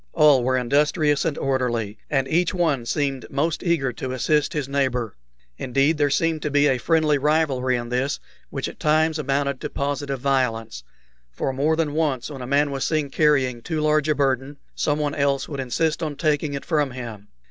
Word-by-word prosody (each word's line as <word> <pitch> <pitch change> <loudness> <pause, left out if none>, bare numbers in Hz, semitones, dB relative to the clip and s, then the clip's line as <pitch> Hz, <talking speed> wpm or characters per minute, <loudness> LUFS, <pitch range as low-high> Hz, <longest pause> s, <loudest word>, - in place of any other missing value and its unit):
All 150 -5 +5
were 130 +1 +1
industrious 145 +3 +2
and 160 -3 -1
orderly, 120 -6 -1
and 135 -2 +1
each 170 +5 +1
one 145 -9 0
seemed 135 -2 -2
most 155 +4 -1
eager 155 -8 0
to 130 -1 -5
assist 150 +3 +1
his 150 -6 -2
neighbor. 130 -5 -1 0.4
Indeed, 140 +5 +1
there 145 -1 +3
seemed 160 +3 +1
to 150 - -2
be 145 0 +3
a 135 -3 +2
friendly 155 -1 +2
rivalry 140 -4 +1
in 120 -1 -4
this 125 +3 -1 0.3
which - - -3
at - - -10
times 155 +1 +2
amounted 140 -1 -1
to - - -4
positive 140 -1 -3
violence; 115 - -1 0.5
for 95 - -3
more 145 +4 +1
than 160 -3 -1
once 150 -4 -1
when 135 -3 -7
a 125 - -6
man 145 +2 +2
was 135 -1 -2
seen 150 -3 -1
carrying 135 -6 +2
too 160 +5 -3
large 155 0 +2
a 155 - +3
burden, 135 0 0 0.2
someone 145 -1 0
else 140 -1 0
would 140 -3 -6
insist 155 +6 -1
on 155 -3 -3
taking 150 0 0
it 140 - -6
from 150 -4 +1
him. 115 -5 -8
140 Hz, 190 wpm, -23 LUFS, 130-150 Hz, 0.5 s, All